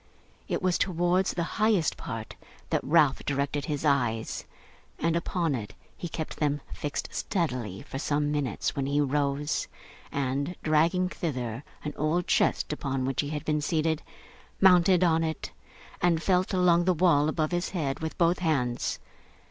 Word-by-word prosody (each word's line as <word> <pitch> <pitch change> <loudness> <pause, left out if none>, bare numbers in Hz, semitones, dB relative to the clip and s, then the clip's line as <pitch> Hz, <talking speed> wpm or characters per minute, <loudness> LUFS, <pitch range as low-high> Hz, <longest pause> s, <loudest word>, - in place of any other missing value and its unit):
It - - -2
was 185 -1 +2
towards 180 +1 +1
the 170 - 0 0.2
highest 215 -7 +3
part - - -6 0.4
that - - +1
Ralph 145 -2 +3
directed 140 0 -1
his 150 0 -2
eyes; 120 -6 0 0.5
and 165 0 +1
upon 170 -2 0
it 110 -5 -5 0.2
he 175 - -5
kept 160 0 -5
them 145 -1 0
fixed 145 -1 -4
steadily 125 - -2
for 135 - -6
some 145 +1 0
minutes, 145 -7 -1
when 135 -1 -1
he 145 +1 +1
rose, 145 +1 0 0.4
and 140 +5 -1
dragging 165 +4 +3
thither 130 -9 -4 0.2
an 150 - -4
old 165 +4 +1
chest - - +2
upon 135 -3 -2
which 135 0 0
he 145 - -4
had 150 -1 -4
been 150 -1 +1
seated, 160 0 0 0.6
mounted 180 -1 +6
on 165 -2 +3
it, 160 -1 -3 0.5
and 170 -2 +2
felt 185 -1 +2
along 175 -2 +4
the 185 -1 +3
wall 155 -3 +4
above 155 0 0
his 175 +1 -1
head 145 -7 -2
with 160 0 -4
both 170 0 +3
hands. 135 -8 0
155 Hz, 155 wpm, -28 LUFS, 140-175 Hz, 0.6 s, mounted